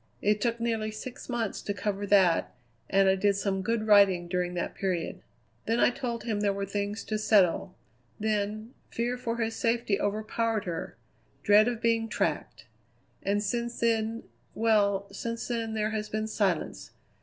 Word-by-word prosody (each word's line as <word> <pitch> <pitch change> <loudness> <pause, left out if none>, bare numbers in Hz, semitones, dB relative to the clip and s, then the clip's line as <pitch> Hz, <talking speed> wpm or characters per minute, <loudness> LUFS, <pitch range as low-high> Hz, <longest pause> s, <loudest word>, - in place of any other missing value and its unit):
It 210 0 +1
took 235 -1 0
nearly 225 -2 -1
six 215 +5 -8
months 235 -4 -2
to 205 - -3
cover 200 +1 -2
that, 190 -4 +3 0.3
and 195 0 +4
I 190 - +5
did 200 +1 +2
some 195 -1 -1
good 225 +2 -1
writing 200 -4 +5
during 180 0 -1
that 175 - -2
period. 180 -4 -2 0.5
Then 230 +2 +1
I - - +5
told 240 -3 -4
him 220 -3 -1
there 205 -1 +2
were 200 0 -3
things 205 +2 -3
to 215 -1 -2
settle; 190 -4 +3 0.4
then, 215 +2 -2 0.2
fear 240 +2 -1
for 235 -2 -3
his 225 -1 -1
safety 230 -3 0
overpowered 215 +1 -1
her: 170 -2 -5 0.5
dread 210 +2 +6
of 240 -1 -3
being 230 -1 +2
tracked. - - -2 0.6
And 205 +1 0
since 235 +3 -2
then 230 0 0 0.3
well, 205 -3 +2
since 230 +3 -4
then 230 -2 -2
there 215 0 0
has 215 -1 -3
been 215 0 -2
silence. 200 -6 -1
215 Hz, 165 wpm, -28 LUFS, 200-230 Hz, 0.6 s, dread